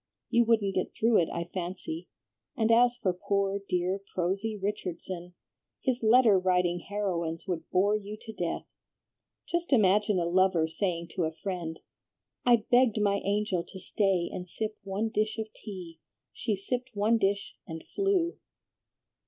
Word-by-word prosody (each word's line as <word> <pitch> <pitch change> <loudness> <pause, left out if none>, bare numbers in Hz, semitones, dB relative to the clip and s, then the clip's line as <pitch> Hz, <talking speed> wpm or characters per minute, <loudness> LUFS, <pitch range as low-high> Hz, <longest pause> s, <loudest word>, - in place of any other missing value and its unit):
You 235 0 +5
wouldn't 215 -4 +2
get 185 - -2
through 230 0 +4
it, 165 - +1
I 170 - -2
fancy; 175 -2 -4 0.5
and 225 0 +3
as 245 +1 +5
for 185 -6 0
poor, 200 +2 0
dear, 180 +2 0 0.2
prosy 195 +5 -1
Richardson, 180 -3 -4 0.4
his 255 -2 -1
letter 225 -3 +6
writing 180 -1 +2
heroines 175 -4 -3
would 170 -3 -3
bore 200 +3 +3
you 210 0 -5
to 220 - -8
death. 175 -5 -3 0.8
Just 345 -1 -2
imagine 210 -3 +4
a 175 - +1
lover 180 -2 +3
saying 170 0 -2
to 175 0 -1
a 160 - -1
friend, 165 -1 -5 0.7
'I 235 -3 +5
begged 245 -3 +5
my 200 -1 +3
angel 200 -3 0
to 190 - -10
stay 190 -2 +1
and 180 0 -6
sip 215 +3 -3
one 200 +3 -1
dish 215 +1 0
of 220 -1 -5
tea. 180 -5 -9 0.3
She 220 -3 -1
sipped 245 +5 -4
one 215 +3 +3
dish 200 -1 0
and 160 -1 -6
flew.'" 390 -3 0
195 Hz, 155 wpm, -29 LUFS, 180-220 Hz, 0.8 s, letter